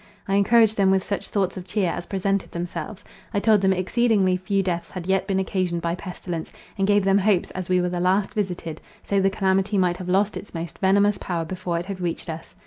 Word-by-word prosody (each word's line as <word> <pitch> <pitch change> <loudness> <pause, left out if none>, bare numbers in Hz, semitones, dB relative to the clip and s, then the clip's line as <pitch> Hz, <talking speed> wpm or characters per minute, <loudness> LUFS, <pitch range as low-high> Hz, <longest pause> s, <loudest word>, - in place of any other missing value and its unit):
I 195 - -1
encouraged 220 +2 +4
them 195 -1 +4
with 190 -1 +3
such 200 - -4
thoughts 190 -2 -1
of 185 0 -7
cheer 195 -6 0
as 175 - -5
presented 195 0 -1
themselves. 175 +4 -5 0.3
I - - +3
told 215 -1 +4
them 190 0 +3
exceedingly 190 0 +2
few 195 +1 0
deaths 175 -2 -2
had 180 -2 -7
yet 190 0 +1
been 195 -2 0
occasioned 185 -3 -1
by 170 0 0
pestilence, 175 -2 -6 0.2
and 195 0 0
gave 205 -1 +3
them 195 +1 +4
hopes, 195 -2 +2
as 185 -1 -6
we 180 0 +3
were 180 0 0
the 175 0 -3
last 190 +3 +1
visited, 180 -6 -3 0.2
so 200 - +1
the 195 - +3
calamity 195 +1 +1
might 180 -2 +2
have 180 -1 -6
lost 200 +3 +2
its 200 - -10
most 165 -1 -6
venomous 200 +2 +3
power 170 -3 -2
before 175 0 -3
it 170 - -3
had 190 -1 -6
reached 170 -1 -3
us. 160 +1 -9
190 Hz, 225 wpm, -24 LUFS, 180-200 Hz, 0.3 s, encouraged